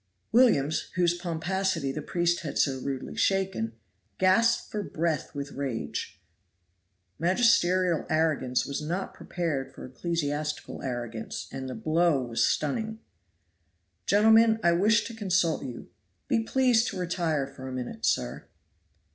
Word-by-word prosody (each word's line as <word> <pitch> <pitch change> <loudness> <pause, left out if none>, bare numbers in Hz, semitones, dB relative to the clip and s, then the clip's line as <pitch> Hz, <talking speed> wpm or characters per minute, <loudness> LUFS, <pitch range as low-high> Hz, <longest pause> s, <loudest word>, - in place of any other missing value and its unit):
Williams, 195 - +3
whose 175 -2 +3
pomposity 175 -2 -1
the 150 - -4
priest 175 0 0
had 155 - -5
so 135 -2 +2
rudely 135 0 -4
shaken, 190 - 0 0.4
gasped 190 +5 +3
for 210 - -2
breath 160 -5 -2
with 140 0 -5
rage. 125 - -4 1.0
Magisterial 185 -2 +3
arrogance 150 -6 +1
was 140 +1 -4
not 175 +5 -3
prepared 160 -7 -3
for - - -10
ecclesiastical 150 +1 -3
arrogance, 120 -4 -5
and 135 -1 -5
the 130 - -5
blow 160 -3 +2
was 115 -1 0
stunning. 220 - 0 1.1
"Gentlemen, 220 +2 +5
I 170 - +5
wish 210 +5 +3
to 230 - -6
consult 185 -6 +1
you. 125 -3 -8 0.4
Be 225 - +2
pleased 245 0 +3
to 195 - -4
retire 170 -5 -1
for 135 -1 -10
a - - -5
minute, 125 -1 -6
sir." - - 0
165 Hz, 130 wpm, -28 LUFS, 140-190 Hz, 1.1 s, Gentlemen